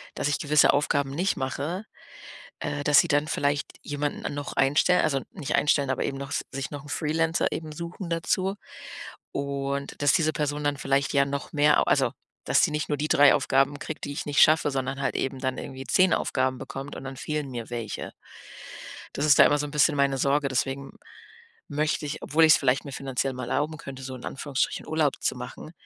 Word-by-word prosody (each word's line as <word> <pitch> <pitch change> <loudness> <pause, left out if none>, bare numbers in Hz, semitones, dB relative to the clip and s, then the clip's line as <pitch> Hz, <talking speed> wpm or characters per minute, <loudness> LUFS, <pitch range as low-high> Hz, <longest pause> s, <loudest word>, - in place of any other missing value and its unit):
dass 145 - -1
ich 145 - 0
gewisse 150 -1 +4
Aufgaben 140 -1 +1
nicht 180 +7 0
mache, 150 +9 -3 0.7
äh, 150 -1 -3
dass 145 -1 +6
sie - - +5
dann 145 +1 +1
vielleicht 145 -1 0 0.2
jemanden 145 0 -3
noch 145 0 -5
einstellen, 145 +6 +3
also, 135 -3 0
nicht 155 -8 -4
einstellen, 145 -2 +2
aber 130 - -1
eben 135 - -3
noch 140 +1 -6 0.2
sich 135 0 -5
noch 145 -1 -7
'n - - -12
Freelancer 160 +2 0
eben 160 -1 -4
suchen 170 +3 -7
dazu. 185 +4 0 0.8
Und, 140 0 -3
dass 145 - +5
diese 155 -1 +2
Person 150 -1 -2
dann 145 -1 0
vielleicht 135 0 0
ja 140 0 +5
noch 140 0 -5
mehr 150 0 +4
au - - +2
also, 130 -3 +2 0.3
dass - - +3
sie - - +3
nicht 150 0 -2
nur 145 -2 -1
die 150 - -1
3 145 -2 +6
Aufgaben 135 +2 +2
kriegt, 155 +1 -6
die 145 - -5
ich - - -4
nicht 145 -1 +2
schaffe, 155 -1 +5
sondern 135 0 -3
halt - - 0
eben 135 0 -2
dann 130 -1 -2
irgendwie 135 0 -7
10 185 +5 +4
Aufgaben 130 0 0
bekommt 135 +3 -7
und - - -8
dann 135 0 -7
fehlen 150 0 -3
mir 120 -2 -6
welche. 115 -3 -5 1.0
Das 145 - -1
ist 150 - +6
da - - +10
immer 145 - +3
so 150 - -2
'n - - -9
bisschen 150 +1 +3
meine 140 -1 +2
Sorge, 140 +1 +2
deswegen 135 +1 -2 0.8
möchte 150 +2 -1
ich, 150 +2 -4
obwohl 160 +3 +3
ich's 155 - +7
vielleicht 130 -1 +1
mir 140 - -8
finanziell 135 0 -2
mal 125 -1 -6
erlauben 150 +3 -1
könnte, 135 -2 -9
so 130 0 -6
in 125 - -10
Anführungsstrichen, 140 -1 -2
Urlaub 155 -3 +1
zu - - +1
machen, - - -9
145 Hz, 205 wpm, -26 LUFS, 135-150 Hz, 1.0 s, da